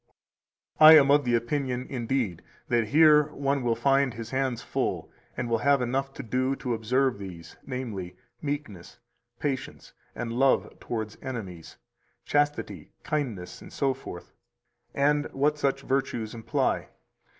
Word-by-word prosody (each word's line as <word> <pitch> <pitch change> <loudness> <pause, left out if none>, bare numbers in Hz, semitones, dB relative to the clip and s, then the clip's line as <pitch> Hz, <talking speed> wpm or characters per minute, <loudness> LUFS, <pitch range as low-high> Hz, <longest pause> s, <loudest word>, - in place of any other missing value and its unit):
313 155 - +10
I - - +12
am 140 -1 +3
of 145 -2 +4 0.2
opinion, 130 -1 -2
indeed, 120 -7 -2 0.3
that 120 -2 +2
here 150 +2 +5
one 140 0 0
will 120 -2 +1
find 135 +1 +2
his 115 0 -7
hands 130 -2 -1
full, - - -2 0.3
[and 125 - -2
will 115 -1 +1
have 140 +2 +3
enough] 135 +3 -1
to - - -6
do 130 +3 0
to 125 -3 -3
observe 125 +1 +1
these, 85 -4 -9
namely, 115 -9 -5 0.3
meekness, 140 - -5 0.4
patience, 140 -3 -4 0.2
and 115 0 -4
love 135 +2 +1
towards 110 -3 -5
enemies, 95 -10 -7 0.5
chastity, 145 0 -1
kindness, 125 - -3
etc., 135 -10 -3 0.7
and 145 +1 +2
what 150 +2 +1
such 135 -1 0
virtues 125 -5 -1
imply. 115 -1 -1
130 Hz, 130 wpm, -27 LUFS, 115-140 Hz, 0.7 s, I